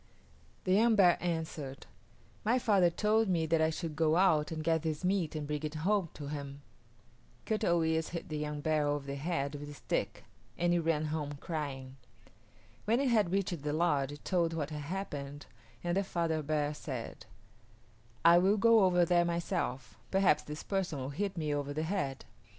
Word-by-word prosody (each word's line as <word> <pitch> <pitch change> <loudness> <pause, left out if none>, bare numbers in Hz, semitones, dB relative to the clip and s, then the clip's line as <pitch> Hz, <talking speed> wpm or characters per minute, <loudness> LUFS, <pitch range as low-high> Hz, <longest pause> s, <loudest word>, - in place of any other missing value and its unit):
The 185 - +1
young 225 +3 +5
bear 180 -4 +6
answered, 160 -5 -4 0.6
"My 230 +4 +3
father 205 -8 +4
told 215 +5 +2
me 170 -3 +1
that 160 0 +2
I 160 - +3
should 160 -1 -4
go 160 0 +2
out 170 -5 +3
and 155 -1 -4
get 165 0 +2
this 160 0 -3
meat 180 -4 0
and 150 -1 -3
bring 150 0 -3
it 155 0 -4
home 185 +3 +1
to 145 - -7
him." 140 -1 -6 0.8
Kut 220 0 -1
o 170 -4 +3
yis´ 160 0 0
hit 170 - -5
the 155 - -4
young 150 0 -3
bear 155 -1 +1
over 145 -1 -1
the 140 - -4
head 140 -1 -2
with 145 0 -7
a 145 - -9
stick - - -3 0.3
and 175 0 +2
it 175 - +3
ran 160 -2 0
home 145 -2 -3
crying. 140 -3 -5 0.9
When 230 +3 +2
it 275 -1 +2
had 215 -7 +3
reached 190 -4 -1
the 150 0 -2
lodge 145 -4 +1
it 145 - -11
told 170 -3 +1
what 155 -2 -3
had 150 -1 -4
happened 145 -5 -5 0.4
and 175 0 0
the 195 - +2
father 165 -4 -1
bear 150 0 -1
said, 130 -6 -7 1.0
"I 170 +1 +8
will 195 +4 +3
go 230 0 +5
over 180 -1 +4
there 175 0 +3
myself; 170 -6 -3
perhaps 190 -6 +3
this 150 0 -7
person 190 -6 -2
will 130 0 -4
hit 195 +5 -3
me 155 -2 -1
over 145 0 -2
the 155 - -1
head." 160 -7 -2
160 Hz, 190 wpm, -32 LUFS, 145-180 Hz, 1.0 s, I